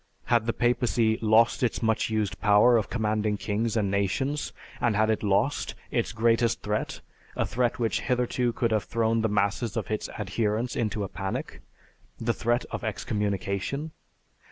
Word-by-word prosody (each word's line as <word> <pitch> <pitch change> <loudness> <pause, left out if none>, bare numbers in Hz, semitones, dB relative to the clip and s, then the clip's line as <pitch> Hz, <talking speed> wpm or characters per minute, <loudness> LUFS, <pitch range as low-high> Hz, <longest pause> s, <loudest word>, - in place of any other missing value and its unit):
Had 120 -2 +2
the - - +3
papacy 120 -2 +1
lost 115 +4 +4
its 125 -1 0
much 110 0 +1
used 110 -2 -1
power 105 +3 +6
of 110 -4 +1
commanding 110 -2 0
kings 110 +3 -1
and 100 -3 +1
nations, 130 +9 -1 0.3
and 115 -3 +1
had 110 +1 +3
it 110 - -1
lost 105 +7 0 0.2
its 120 -5 0
greatest 115 +1 +2
threat, 105 +1 -2 0.3
a - - 0
threat 120 0 0
which 115 -2 0
hitherto 125 -1 0
could 115 0 -1
have 110 -2 +1
thrown 115 -1 +1
the 110 - +1
masses 100 +2 0
of - - -3
its 110 - -2
adherents 105 +3 -1
into 105 -2 -1
a - - -2
panic, 95 +1 -5 0.6
the 115 0 0
threat 120 +1 0
of - - -4
excommunication? 105 - -2
110 Hz, 160 wpm, -27 LUFS, 105-120 Hz, 0.6 s, power